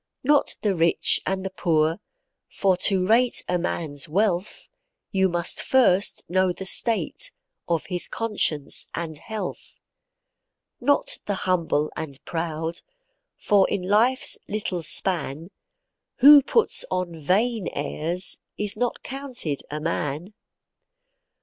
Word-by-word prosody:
Not 290 +2 +2
the 205 -2 +2
rich 165 0 +2
and 190 0 -2
the 190 - -4
poor, 160 -2 +1 0.5
for 190 -2 +1
to 190 -2 +1
rate 235 +4 +3
a 180 0 0
man's 155 -5 -4
wealth, 190 +1 -1 0.5
You 190 -1 +2
must 175 0 0
first 210 -7 +2
know 185 +1 +2
the 190 +2 -7
state 235 - +2 0.4
of 170 -2 -1
his 180 -2 -1
conscience 205 -10 -1
and 165 -2 -4
health. 215 -2 -7 1.0
Not 285 +3 +1
the 205 - 0
humble 170 -5 0
and 140 -4 -6
proud, 165 0 -4 0.6
for 200 -3 +3
in 185 - -2
life's 225 +7 +3
little 200 -4 -3
span, 165 0 0 0.6
Who 285 +2 +9
puts 455 - +1
on 175 -3 -3
vain 215 +5 +1
airs, 165 +5 -1 0.2
is 210 -1 0
not 245 +2 -2
counted 260 - -4
a 150 - -4
man. 155 +3 -3
185 Hz, 120 wpm, -24 LUFS, 165-215 Hz, 1.0 s, Who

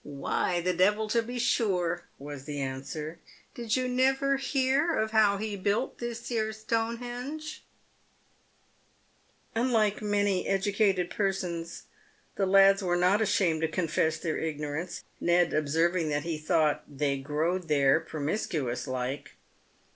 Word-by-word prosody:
" - - -37
"Why, 145 +5 -1
the 180 +1 +1
devil, 210 +5 +2
to 230 +2 +3
be 245 +2 -6
sure," 180 -8 +1
was 140 -1 -8
the 145 -1 -4
answer. 140 +4 -5 0.2
" - - -31
Did 230 -2 -1
you 255 -1 0
never 270 +2 +2
hear 275 +4 +1
of 220 0 0
how 215 -2 +4
he 210 0 -3
built 200 +6 -1
this 235 -1 -5
here 220 -2 -1
Stonehenge 245 +7 -4 1.0
?" - - -38
i - - +1
Unlike 220 -5 +2
many 205 -2 +1
educated 195 -2 +1
persons, 180 -4 -2 0.5
the 195 - +1
lads 195 +1 +6
were 175 -2 +1
not 185 +4 +3
ashamed 190 -6 +2
to 160 - +2
con 175 +2 -1
I - - -7
fess 160 +1 +1
their 160 -2 -2
ignorance, 150 +1 -4 0.2
Ned 175 0 +3
observing 160 +3 +1
that 145 -1 -1
he 165 -2 -3
thought 155 -1 +1
" - - -32
they 140 -1 0
growd? 160 +6 -1
there 140 -1 +4
promiscuous 150 - -3
like." 130 +2 -4
185 Hz, 150 wpm, -29 LUFS, 155-220 Hz, 1.0 s, lads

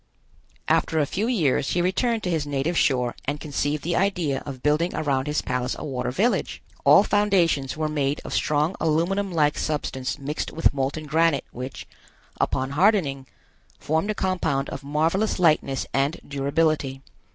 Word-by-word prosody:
After 160 - +2
a 150 - +3
few 200 +10 -2
years 155 - +1
he 175 - +2
returned 225 +5 0
to 180 - -1
his 155 -3 -1
native 145 +4 -1
shore 125 -6 +1
and 145 +2 -2
conceived 145 0 -2
the 170 +1 -1
idea 175 -8 0
of 130 -3 -7
building 155 +4 +1
around 135 -3 0
his 150 +1 -1
palace 125 0 -2
a - - -6
water 125 -3 -2
village. 205 - 0 0.3
All 200 - +7
foundations 180 -11 +1
were 155 0 0
made 145 -1 -1
of - - -5
strong 150 +5 +1
aluminum 175 +5 +1
like 150 -3 +2
substance 130 -4 -2
mixed 145 +2 -4
with 165 - +2
molten 140 +3 -2
granite 160 -1 +2
which, 125 +2 -7 0.5
upon 130 +1 0
hardening, 150 -6 +2 0.5
formed 160 +7 -1
a 215 - 0
compound 160 -8 -1
of 135 - -7
marvelous 160 +9 0
lightness 155 -6 +2
and 140 +3 0
durability. 140 -1 0
150 Hz, 160 wpm, -24 LUFS, 135-175 Hz, 0.5 s, All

